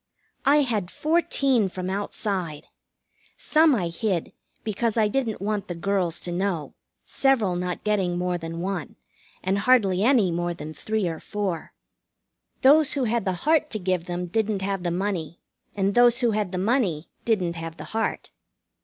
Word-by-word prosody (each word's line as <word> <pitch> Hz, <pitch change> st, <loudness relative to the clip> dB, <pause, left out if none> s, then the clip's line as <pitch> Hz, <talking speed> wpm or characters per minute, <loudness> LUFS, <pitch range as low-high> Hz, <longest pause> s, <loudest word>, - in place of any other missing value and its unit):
I 295 Hz, +2 st, +6 dB
had 215 Hz, -9 st, -1 dB
fourteen 275 Hz, -, +1 dB
from 185 Hz, 0 st, -5 dB
outside. 190 Hz, -5 st, -3 dB, 0.7 s
Some 310 Hz, -2 st, +4 dB
I 180 Hz, -6 st, -1 dB
hid, 180 Hz, 0 st, -2 dB, 0.3 s
because 225 Hz, +1 st, -1 dB
I 215 Hz, -1 st, +4 dB
didn't 225 Hz, -1 st, -1 dB
want 205 Hz, 0 st, -2 dB
the 175 Hz, -, -4 dB
girls 180 Hz, -1 st, -1 dB
to 175 Hz, -, -4 dB
know, 175 Hz, -3 st, -2 dB, 0.3 s
several 230 Hz, -10 st, +2 dB
not 180 Hz, 0 st, -3 dB
getting 195 Hz, -5 st, +1 dB
more 180 Hz, 0 st, -1 dB
than 165 Hz, 0 st, -5 dB
one, 185 Hz, -3 st, -3 dB, 0.5 s
and 190 Hz, +2 st, +1 dB
hardly 200 Hz, -5 st, +3 dB
any 225 Hz, -6 st, +4 dB
more 175 Hz, 0 st, -1 dB
than 155 Hz, 0 st, -7 dB
three 215 Hz, +2 st, -1 dB
or 165 Hz, -2 st, -4 dB
four. 195 Hz, -6 st, -4 dB, 0.9 s
Those 290 Hz, +2 st, +6 dB
who 275 Hz, -, 0 dB
had 235 Hz, -2 st, 0 dB
the 190 Hz, -, +1 dB
heart 310 Hz, 0 st, +3 dB
to 215 Hz, -, -2 dB
give 185 Hz, -3 st, -1 dB
them 180 Hz, 0 st, -3 dB
didn't 210 Hz, +1 st, -1 dB
have 195 Hz, -1 st, -1 dB
the 175 Hz, -, -1 dB
money, 175 Hz, -2 st, -2 dB, 0.4 s
and 200 Hz, 0 st, +1 dB
those 240 Hz, +1 st, +5 dB
who 240 Hz, -2 st, +3 dB
had 210 Hz, -3 st, -1 dB
the 185 Hz, -, -3 dB
money 190 Hz, -, 0 dB, 0.2 s
didn't 180 Hz, -7 st, 0 dB
have 165 Hz, 0 st, -6 dB
the -, -, -7 dB
heart. 225 Hz, 0 st, -2 dB
195 Hz, 165 wpm, -25 LUFS, 175-225 Hz, 0.9 s, I